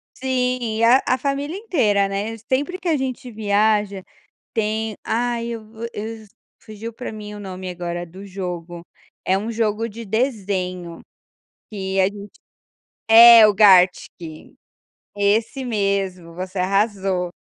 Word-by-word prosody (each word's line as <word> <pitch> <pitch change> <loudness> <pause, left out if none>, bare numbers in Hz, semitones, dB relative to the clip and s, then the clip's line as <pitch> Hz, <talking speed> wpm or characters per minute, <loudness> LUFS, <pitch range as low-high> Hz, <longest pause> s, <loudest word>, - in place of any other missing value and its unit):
Sim, 250 -3 -1
e 230 - 0
a 245 +3 +6
a 255 - +2
família 280 +6 -3
inteira, 220 - +1
né, 205 +3 -4
sempre 285 +8 0
que 365 - -6
a 320 - +3
gente 260 -2 -4
viaja 210 -2 +1 0.5
tem 220 -1 -1
ai, 235 0 -1
eu 230 -2 -5
vou 225 +1 -7
eu 220 +1 -7 0.3
fugiu 220 +2 -9
pra 250 -2 -7
mim 210 -1 -8
o 205 - -9
nome 185 -2 -7
agora 175 -1 -5
do 185 +4 -12
jogo; 175 -3 -6 0.4
é 190 - +1
um 215 +4 -3
jogo 225 0 -1
de 230 +1 -9
desenho, 190 -7 -2 0.7
que 195 -2 -3
a - - +4
gente 200 +1 -6 0.7
é 230 0 +10
o 210 - +2
Gartic, 180 -5 +3 0.6
esse 215 +6 0
mesmo, 195 -6 -2
você 185 +1 -5
arrasou. 195 -2 0
210 Hz, 140 wpm, -21 LUFS, 190-230 Hz, 0.7 s, é